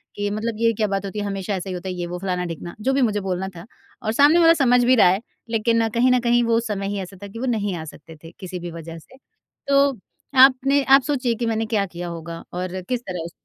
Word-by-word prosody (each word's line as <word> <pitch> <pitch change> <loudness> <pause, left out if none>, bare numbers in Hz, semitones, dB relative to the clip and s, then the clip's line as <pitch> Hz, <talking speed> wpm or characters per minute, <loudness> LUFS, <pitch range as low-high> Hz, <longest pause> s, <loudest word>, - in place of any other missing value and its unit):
कि 205 0 -2
मतलब 220 +2 -3
ये 230 0 +3
क्या 215 0 0
बात 195 0 -2
होती 195 +2 -5
है? 205 - -2
हमेशा 195 0 -3
ऐसा 190 +1 -5
ही - - -3
होता 185 +1 -6
है - - -3
ये 175 -1 -4
वो 180 +1 -5
फलाना-ढिकना, 180 -2 -4
जो 265 +4 +1
भी 275 - +2
मुझे 215 -4 +1
बोलना 190 0 -3
था 170 +3 -10 0.4
और 220 -3 -1
सामने 290 +7 +5
वाला 330 0 +7
समझ 250 -1 +4
भी 255 +1 +5
रहा 215 - +6
है। 190 +4 +1 0.3
लेकिन 230 0 +1
कहीं 245 +3 +2
न 250 - +4
कहीं 240 0 +2
वो 230 0 +2
समय 205 -4 -3
ही 200 0 -3
ऐसा 190 +1 -9
था 200 - -6
कि 230 +4 -9
वो 260 - -2
नहीं 205 -6 -1
आ 160 - -6
सकते 160 +1 -12
थे 165 - -11
किसी 185 -2 -6
भी 175 0 -7
वजह 165 0 -8
से। 260 +11 -19 0.5
तो 280 0 +4 0.6
आपने 275 +1 +2
आप 270 +1 +6
सोचिए 260 -5 0
कि 235 +1 -3
मैंने 225 0 -1
क्या 215 -3 0
किया 175 -1 -7
होगा 165 0 -7
और 185 +1 -4
किस 250 -1 0
तरह 180 -3 -4
उस 170 - -7
205 Hz, 265 wpm, -22 LUFS, 180-240 Hz, 0.6 s, वाला